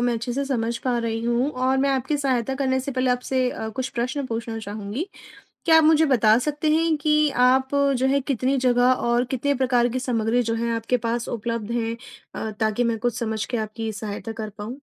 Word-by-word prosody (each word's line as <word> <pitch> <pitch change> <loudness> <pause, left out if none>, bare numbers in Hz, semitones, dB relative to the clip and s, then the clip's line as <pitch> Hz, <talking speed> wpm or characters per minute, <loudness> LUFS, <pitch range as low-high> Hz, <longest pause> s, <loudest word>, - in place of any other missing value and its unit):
मैं 245 0 +2
अच्छे 230 +2 -3
से 280 +3 -1
समझ 235 -4 -1
पा 250 -2 -1
रही 225 -1 -2
हूँ 240 +4 +1
और 255 +1 +1
मैं 275 +1 +2
आपकी 265 +3 0
सहायता 265 -2 0
करने 260 -1 0
से 270 +1 -4
पहले 255 0 +1
आपसे 250 +1 0
अ, 220 - -5
कुछ 255 +4 -4
प्रश्न 255 +3 -2
पूछना 225 -1 -4
चाहूँगी। 215 - -5 0.6
क्या 320 -1 +7
आप 320 - +5
मुझे 315 0 +5
बता 225 -6 +4
सकते 295 +3 -1
हैं 320 0 +2
कि 300 0 +2
आप 260 +1 +3 0.3
जो 260 +2 +1
हैं, 275 +1 +2
कितनी 270 0 0
जगह 250 -1 +3
और 240 0 +1
कितने 285 +2 0
प्रकार 250 -2 +2
की 255 +2 -2
सामग्री 240 -1 +1
जो 230 0 -1
है, 235 +1 -1
आपके 230 +2 0
पास 235 +1 -1
उपलब्ध 230 -1 -3
हैं 230 -1 -1 0.4
अ, 220 - -3
ताकि 220 +2 +1
मैं 230 -1 0
कुछ 240 +1 -1
समझ 220 -3 -2
के 245 - -3
आपकी 220 +1 -4
सहायता 215 +1 -5
कर 215 - -4
पाऊँ? 215 +6 -8
245 Hz, 215 wpm, -23 LUFS, 230-265 Hz, 0.6 s, क्या